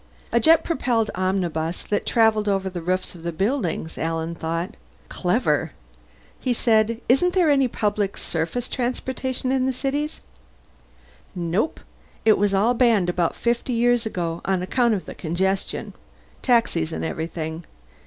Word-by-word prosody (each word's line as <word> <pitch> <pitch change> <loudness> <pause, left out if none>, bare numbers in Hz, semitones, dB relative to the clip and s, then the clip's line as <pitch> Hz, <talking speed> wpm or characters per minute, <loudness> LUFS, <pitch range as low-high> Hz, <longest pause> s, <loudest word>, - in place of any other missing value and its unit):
A 235 - +4
jet 320 +6 +5
propelled 240 -9 0
omnibus 180 -3 -1
that 205 - -2
travelled 220 -3 +3
over 195 -1 0
the 175 -1 -5
roofs 185 +2 -1
of 175 - -12
the 170 +1 -3
buildings, 190 - -1
Alan 165 0 -2
thought. 165 +1 -3 0.3
Clever. - - 0 0.7
He 250 - 0
said, 225 -1 +2
"Isn't 355 +9 +3
there 345 -5 +4
any 275 -2 +4
public 205 -3 -1
surface 165 +10 -2
transportation 255 +1 -2
in 260 -1 +2
the - - +2
city?" 275 +4 -1 1.3
"Nope. 180 - -1 0.4
It 220 - +5
was 205 0 +2
all 205 +5 +3
banned 230 -7 +3
about 175 -2 0
fifty 235 +1 -1
years 240 0 +2
ago, 170 -5 -3
on 190 -2 0
account 235 +3 +2
of 190 - -5
the - - -7
congestion. 190 +3 -2 0.5
Taxis 230 - +2
and - - -3
everything. 160 0 -4
205 Hz, 145 wpm, -23 LUFS, 175-245 Hz, 1.3 s, jet